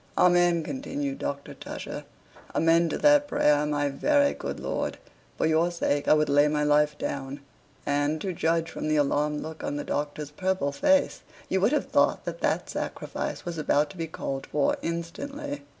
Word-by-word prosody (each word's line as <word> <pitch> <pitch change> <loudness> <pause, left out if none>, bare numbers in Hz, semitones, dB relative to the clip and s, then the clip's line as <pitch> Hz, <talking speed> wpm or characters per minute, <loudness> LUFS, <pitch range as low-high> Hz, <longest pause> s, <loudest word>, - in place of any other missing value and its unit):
"Amen," 175 -2 +4
continued 275 - -4
Dr. 140 0 -4
Tusher. - - -7 0.5
"Amen 165 +1 +4
to - - -2
that 290 -1 +5
prayer, 150 - +3
my 145 -1 0
very 285 - +2
good - - -5
lord! - - -2 0.4
for - - +1
your 160 +2 +3
sake 145 -4 -1
I - - +6
would 150 0 +2
lay 145 +1 +4
my 150 0 0
life 150 0 +3
down" 140 +1 -4 0.4
and, 145 +2 +1
to 190 - -2
judge 165 0 0
from - - -4
the 155 - +2
alarmed 150 +1 +1
look 160 0 -7
of 145 - -3
the 145 - -3
Doctor's 150 0 -3
purple 185 -3 -1
face, 285 - +2 0.3
you 190 - +1
would 205 +6 +4
have 300 - +1
thought - - +2
that - - -5
that - - 0
sacrifice - - -4
was 170 -2 -4
about 150 0 +2
to 190 - -13
be 165 -1 -3
called 135 -3 -5
for 145 -2 +1
instantly. 170 - -4
155 Hz, 180 wpm, -27 LUFS, 145-180 Hz, 0.5 s, I